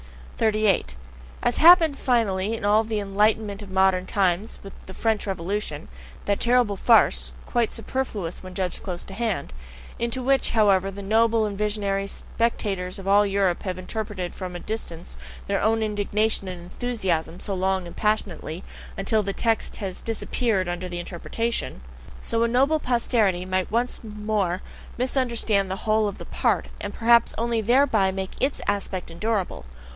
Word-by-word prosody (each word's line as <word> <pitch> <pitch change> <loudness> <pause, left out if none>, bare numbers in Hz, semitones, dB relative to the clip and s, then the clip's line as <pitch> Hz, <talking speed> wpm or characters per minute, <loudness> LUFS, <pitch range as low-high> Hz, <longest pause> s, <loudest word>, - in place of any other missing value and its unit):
38. 215 - +2 0.5
As 240 - +2
happened 330 -3 +7
finally 225 -4 +1
in 210 - -5
all 210 +2 +4
the 220 -1 -2
enlightenment 205 +1 +1
of 205 - -9
modern 190 -1 +2
times 195 +2 0
with 195 - -9
the 190 - -8
French 220 -2 0
Revolution 185 -4 -3 0.4
(that 200 -1 +1
terrible 240 -4 +3
farce, 225 +4 +4
quite 235 -3 0
superfluous 225 -8 -4
when 185 -1 -10
judged 185 -1 -1
close 180 -3 -5
at - - -12
hand, 205 -7 -2 0.5
into 235 +2 -1
which, 270 +1 +3
however, 195 -4 +3
the 200 +1 -8
noble 225 +2 +3
and 205 -1 -3
visionary 200 -1 -1
spectators 200 -5 -2
of 195 -1 -8
all 205 +1 +5
Europe 195 -3 +1
have 185 -3 -3
interpreted 190 -1 -4
from 180 -2 -6
a - - -4
distance 175 -6 -5 0.3
their 200 0 0
own 220 +1 +2
indignation 210 -1 0
and 180 -1 -5
enthusiasm 180 -3 -2
so 200 - -3
long 190 0 0
and 170 - -10
passionately, 195 -5 -1 0.3
UNTIL 215 +3 +1
THE 200 -1 -3
TEXT 225 +1 0
HAS 190 -3 -4
DISAPPEARED 225 -3 -1
UNDER 175 +1 -3
THE 175 0 -4
INTERPRETATION), 190 - -3 0.4
so 230 - -1
a 235 - +4
noble 270 +6 +3
posterity 225 -8 +1
might 185 0 -1
once 240 +3 0
more 210 -4 -2 0.3
misunderstand 235 -6 +1
the 190 +1 -5
whole 215 0 +3
of 200 - -5
the - - -8
past, - - 0
and - - -4
perhaps 235 0 +4
only 230 0 0
thereby 235 -3 +3
make 190 0 -4
ITS 275 +2 0
aspect 195 -3 -2
endurable. 190 - -2
205 Hz, 160 wpm, -25 LUFS, 190-225 Hz, 0.5 s, happened